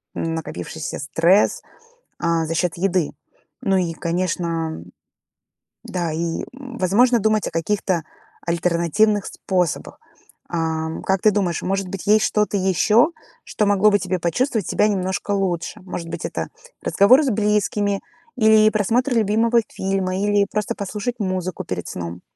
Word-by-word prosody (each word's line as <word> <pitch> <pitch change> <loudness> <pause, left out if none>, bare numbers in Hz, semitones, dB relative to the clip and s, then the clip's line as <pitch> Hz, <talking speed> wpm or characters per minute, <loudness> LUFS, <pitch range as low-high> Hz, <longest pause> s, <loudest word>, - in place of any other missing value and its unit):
н 165 - -2
накопившийся 155 - -5
стресс, 165 +7 +2 0.6
а, 165 -1 +1
за 165 - -2
счет 170 0 0
еды. 180 -3 +1 0.5
Ну 195 -6 +2
и, 175 -3 0
конечно 165 - -2 1.0
Да, 175 -3 -2
и, 165 +1 -2
возможно, 245 -2 +2
думать 215 0 +1
о - - -4
каких-то 175 +1 0 0.4
альтернативных 175 +4 +1
способах. 180 -5 -2 0.5
Ам, 160 -1 -2
как 190 -1 +1
ты 215 - +6
думаешь, 190 -5 0
может 195 +1 -1
быть 195 0 -6
есть 215 +1 +5
что-то 210 -1 +1
еще, 200 - +3 0.3
что 210 - -1
могло 205 +1 +4
бы 205 - +3
тебе 185 0 -1
почувствовать 215 - 0
себя 210 - +2
немножко 190 -1 -2
лучше? 190 -4 -1
Может 180 -2 -6
быть, - - -5
это - - -3 0.4
разговор 225 +8 +5
с 275 - +1
близкими 210 -2 +1 0.4
или 220 -2 +6
просмотр 235 +5 +1
любимого 230 +1 +3
фильма, 190 -1 -2
или 205 0 +2
просто 210 +2 -1
послушать 210 +4 -4
музыку 185 -3 -2
перед 90 -1 -4
сном. 85 0 -6
190 Hz, 135 wpm, -21 LUFS, 170-210 Hz, 1.0 s, ты